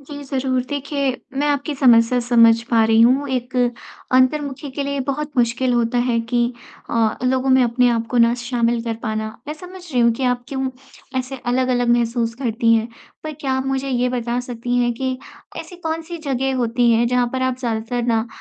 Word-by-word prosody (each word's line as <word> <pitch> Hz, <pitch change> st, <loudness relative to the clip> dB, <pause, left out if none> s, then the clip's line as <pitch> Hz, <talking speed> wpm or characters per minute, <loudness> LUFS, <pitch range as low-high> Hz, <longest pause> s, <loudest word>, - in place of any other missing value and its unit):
जी, 285 Hz, +1 st, -9 dB
ज़रूर 260 Hz, -2 st, -1 dB
देखिए 280 Hz, -1 st, -1 dB, 0.3 s
मैं 290 Hz, -, +1 dB
आपकी 290 Hz, +1 st, -1 dB
समस्या 245 Hz, -2 st, +4 dB
समझ 230 Hz, -1 st, +5 dB
पा 225 Hz, -2 st, +4 dB
रही 225 Hz, 0 st, +4 dB
हूँ, 260 Hz, +5 st, +4 dB
एक 255 Hz, 0 st, -3 dB, 0.6 s
अंतर्मुखी 275 Hz, +2 st, +1 dB
के 270 Hz, +2 st, -4 dB
लिए 280 Hz, 0 st, -2 dB
बहुत 300 Hz, +2 st, -2 dB
मुश्किल 245 Hz, +1 st, +1 dB
होता 240 Hz, 0 st, +1 dB
है 235 Hz, -1 st, +2 dB
कि 240 Hz, 0 st, +1 dB, 0.4 s
अ, 225 Hz, -2 st, +1 dB
लोगों 260 Hz, +1 st, +1 dB
में 260 Hz, 0 st, +5 dB
अपने 245 Hz, +1 st, +3 dB
आप 230 Hz, -1 st, -1 dB
को 245 Hz, -, +1 dB
ना 235 Hz, 0 st, +5 dB
शामिल 240 Hz, -1 st, 0 dB
कर 230 Hz, -1 st, -2 dB
पाना। 220 Hz, -1 st, -2 dB, 0.2 s
मैं 300 Hz, -, -3 dB
समझ 360 Hz, +3 st, -11 dB
रही 250 Hz, -, +2 dB
हूँ 235 Hz, 0 st, +4 dB
कि 255 Hz, +3 st, -3 dB
आप 245 Hz, -1 st, 0 dB
क्यों 265 Hz, -1 st, -2 dB, 0.5 s
ऐसे 260 Hz, +1 st, -4 dB
अलग-अलग 245 Hz, 0 st, +1 dB
महसूस 230 Hz, -1 st, -1 dB
करती 230 Hz, -2 st, +1 dB
हैं। 225 Hz, 0 st, 0 dB, 0.4 s
पर 310 Hz, -, -4 dB
क्या 270 Hz, -3 st, -1 dB
आप 265 Hz, 0 st, -1 dB
मुझे 270 Hz, 0 st, -1 dB
ये 250 Hz, -1 st, +1 dB
बता 240 Hz, -1 st, -2 dB
सकती 245 Hz, 0 st, -3 dB
हैं 240 Hz, -1 st, +2 dB
कि 260 Hz, +1 st, -3 dB, 0.4 s
ऐसी 355 Hz, -, -8 dB
कौन-सी 330 Hz, 0 st, -4 dB
जगह 270 Hz, -3 st, -1 dB
होती 240 Hz, 0 st, +2 dB
हैं 230 Hz, +1 st, +3 dB
जहाँ 250 Hz, 0 st, +2 dB
पर 260 Hz, 0 st, -2 dB
आप 260 Hz, -1 st, 0 dB
ज़्यादातर 230 Hz, 0 st, -2 dB
ना 230 Hz, -1 st, +1 dB
250 Hz, 195 wpm, -20 LUFS, 235-270 Hz, 0.6 s, समझ